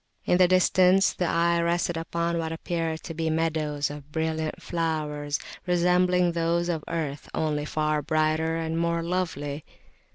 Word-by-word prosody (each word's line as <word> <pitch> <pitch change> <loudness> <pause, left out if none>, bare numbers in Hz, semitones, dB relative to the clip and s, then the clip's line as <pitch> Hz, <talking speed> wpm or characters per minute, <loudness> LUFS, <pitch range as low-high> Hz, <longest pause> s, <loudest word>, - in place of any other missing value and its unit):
In 180 - +3
the 180 - +7
distance 185 +1 +4
the 180 - -1
eye 170 0 +2
rested 170 0 0
upon 170 +1 -1
what 160 -1 -2
appeared 165 -1 -3
to 165 - -6
be 160 0 -1
meadows 155 -2 0
of 145 0 -10
brilliant 160 0 -2
flowers 150 -3 -2 0.3
resembling 180 0 +3
those 170 +1 0
of 160 -3 -2
earth, 155 -4 -4
only 150 -2 -1
far 155 0 0
brighter 155 +1 +1
and 165 0 -2
more 170 0 0
lovely. 160 -5 -2
165 Hz, 150 wpm, -26 LUFS, 155-170 Hz, 0.3 s, the